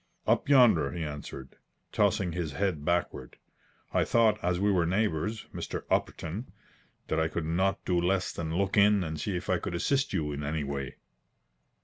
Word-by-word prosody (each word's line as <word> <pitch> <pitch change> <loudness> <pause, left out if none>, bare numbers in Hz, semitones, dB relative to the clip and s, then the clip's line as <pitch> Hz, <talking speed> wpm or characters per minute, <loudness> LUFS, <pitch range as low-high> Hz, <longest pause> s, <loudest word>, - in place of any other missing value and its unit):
"Up - - +1
yonder," 120 - +5
he 85 - -3
answered, 75 -3 -7 0.3
tossing 90 -2 +1
his 85 -2 -3
head 95 -7 -1
backward. 80 -6 -2 0.6
"I - - +3
thought 110 -2 +2
as 90 0 +1
we 100 +1 +2
were 90 -4 +2
neighbours, 105 +2 -1
Mr. - - -5
Upperton, 95 +10 -1 0.6
that 80 - 0
I 80 - +2
could 80 0 -3
not 95 +4 0
do 90 -2 +1
less 95 +1 +1
than 80 -1 -4
look 100 +2 0
in 100 -1 +5
and 80 -2 -4
see 100 -4 -2
if 90 - -7
I 95 -3 +1
could 85 - -4
assist 135 +10 +1
you 80 -6 -1
in 70 0 -4
any 75 +1 -2
way." 70 -2 -4
90 Hz, 175 wpm, -29 LUFS, 80-100 Hz, 0.6 s, yonder